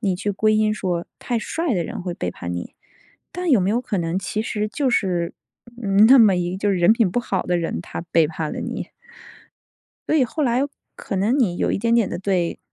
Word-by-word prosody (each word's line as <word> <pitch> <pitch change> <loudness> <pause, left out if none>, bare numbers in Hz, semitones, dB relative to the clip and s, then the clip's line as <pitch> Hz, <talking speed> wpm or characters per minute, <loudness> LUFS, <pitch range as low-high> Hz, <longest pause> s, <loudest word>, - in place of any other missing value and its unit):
你 195 -5 0
去 205 +2 -2
归 215 +2 +2
因 215 0 +2
说 175 -4 -2
太 240 -2 -1
帅 320 +7 -2
的 175 - 0
人 - - -6
会 180 -1 -3
背 90 - -3
叛 90 0 -6
你， 85 0 -6 0.6
但 360 -1 -3
有 245 -8 +5
没 185 - +1
有 235 +3 +1
可 205 -6 -3
能 170 +2 -1
其 210 +3 -3
实 210 -2 -2
就 265 +5 0
是， 180 -7 0 0.5
嗯， 200 +1 +5
那 265 +1 +8
么 215 -4 +6
一 175 0 -1
个， 185 - -4
就 205 +1 0
是 195 - +1
人 175 +4 +5
品 225 -3 +2
不 245 - 0
好 195 -5 -2
的 180 - 0
人， 170 0 -2
他 - - -7
背 165 -2 +5
叛 155 0 -4
了 - - -5
你？ - - -5 1.2
所 - - +1
以 280 - +4
后 300 +5 -2
来 245 +1 +2 0.3
可 - - -5
能 215 +8 +1
你 185 -9 +1
有 - - 0
一 - - 0
点 230 +1 +1
点 230 -4 +3
地 - - -4
对 185 -3 -1
200 Hz, 255 characters per minute, -22 LUFS, 175-230 Hz, 1.2 s, 那